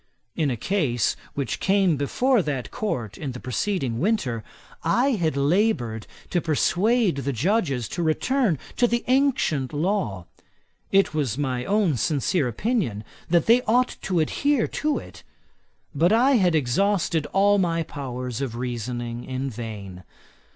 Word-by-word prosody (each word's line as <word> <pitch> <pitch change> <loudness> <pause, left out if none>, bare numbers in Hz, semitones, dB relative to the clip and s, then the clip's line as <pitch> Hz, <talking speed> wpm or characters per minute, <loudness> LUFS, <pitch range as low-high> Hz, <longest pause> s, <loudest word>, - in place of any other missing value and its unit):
In 155 -3 +1
a 125 - -2
case 130 - 0 0.2
which 135 -6 -2
came 195 -4 +3
before 235 - +2
that 140 -7 -3
Court 120 - -3
the 130 -5 -4
preceding 130 - -2
winter, 135 - 0 0.4
I 240 +12 +2
had 165 - 0
laboured 140 - +1 0.2
to 175 - +1
persuade 185 - +2
the 140 0 -2
Judges 140 - 0
to 175 - -3
return 190 - +1 0.2
to 245 - +4
the 235 0 0
ancient 255 - +1
law. 150 - -1 0.7
It 195 -3 +3
was 140 -7 -1
my 130 -3 -2
own 200 -9 +2
sincere 145 - +1
opinion, 125 - -1 0.3
that 170 -1 +3
they 235 +2 +5
ought 250 +3 +2
to 185 -3 0
adhere 275 - +1
to 305 -1 -1
it; - - -10 0.7
but 165 +5 +3
I 245 +5 +4
had 180 -5 +3
exhausted 160 +3 +1
all 200 +1 +3
my 165 -3 +1
powers 125 -4 -5
of 125 -4 -3
reasoning 120 0 -4
in 130 +1 -3
vain. 105 -5 -7
155 Hz, 140 wpm, -24 LUFS, 125-205 Hz, 0.7 s, they